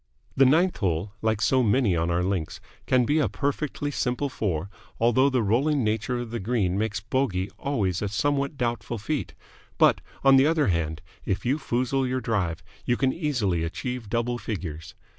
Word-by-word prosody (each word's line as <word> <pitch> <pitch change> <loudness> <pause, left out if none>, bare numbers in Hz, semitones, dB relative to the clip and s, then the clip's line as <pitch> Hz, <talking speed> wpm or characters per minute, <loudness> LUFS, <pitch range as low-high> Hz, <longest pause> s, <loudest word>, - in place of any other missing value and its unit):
The 135 -1 +6
ninth 170 +7 +3
hole, 95 0 -1
like 110 -1 0
so 130 -1 +3
many 110 -3 +3
on 85 +1 0
our 85 +1 +1
links, 90 -4 -2 0.3
can 125 -1 +3
be 150 +6 +2
a 135 -9 +2
perfectly 145 +6 -2
simple 135 +1 -1
four, 95 -8 -2 0.3
although 120 +4 +4
the 130 -4 +1
rolling 135 +7 +2
nature 110 +3 0
of 120 -2 -5
the 115 - -3
green 95 -3 0
makes 105 -1 -1
bogey 105 -5 -1
always 100 -11 -1
a 105 - -1
somewhat 140 +7 0
doubtful 120 -2 -2
feat; 140 +8 -3 0.4
but, - - +4 0.2
on 135 -1 +7
the 135 +2 +5
other 155 -6 +2
hand, 80 -3 -1 0.2
if 95 +3 -2
you 135 +5 +1
foozle 130 0 0
your 130 +1 -1
drive, 95 -8 -1 0.2
you 120 - +1
can 130 -1 +1
easily 120 - 0
achieve 115 +7 -4
double 120 +1 -1
figures. 80 -9 -6
120 Hz, 180 wpm, -26 LUFS, 95-135 Hz, 0.4 s, on